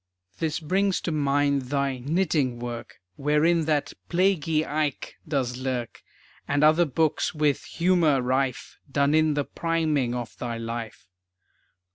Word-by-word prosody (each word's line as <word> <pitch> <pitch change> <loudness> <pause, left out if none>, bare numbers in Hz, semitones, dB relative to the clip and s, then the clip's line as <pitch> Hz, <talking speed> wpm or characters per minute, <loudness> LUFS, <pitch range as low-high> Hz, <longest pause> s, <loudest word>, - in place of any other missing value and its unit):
This 160 -2 -1
brings 190 +4 +1
to 170 - -2
mind 140 -3 +1
thy 140 -2 0
Knitting 145 -3 0
Work, 120 -1 -6 0.2
Wherein 150 +3 +2
that 150 -2 0 0.2
"plaguey 170 -4 +2
Ike" 150 -2 -2
does 130 -5 -1
lurk, 130 -3 -4 0.5
And 145 +1 +1
other 155 +3 +5
books 160 +2 0
with 150 -2 +1
humor 170 -5 +2
rife, 130 +1 -1
Done 140 +1 +2
in 155 -1 +3
the 145 -1 0
priming 155 -7 0
of 120 -2 -5
thy 120 -2 -3
life. 115 -2 -6
145 Hz, 130 wpm, -26 LUFS, 130-160 Hz, 0.5 s, other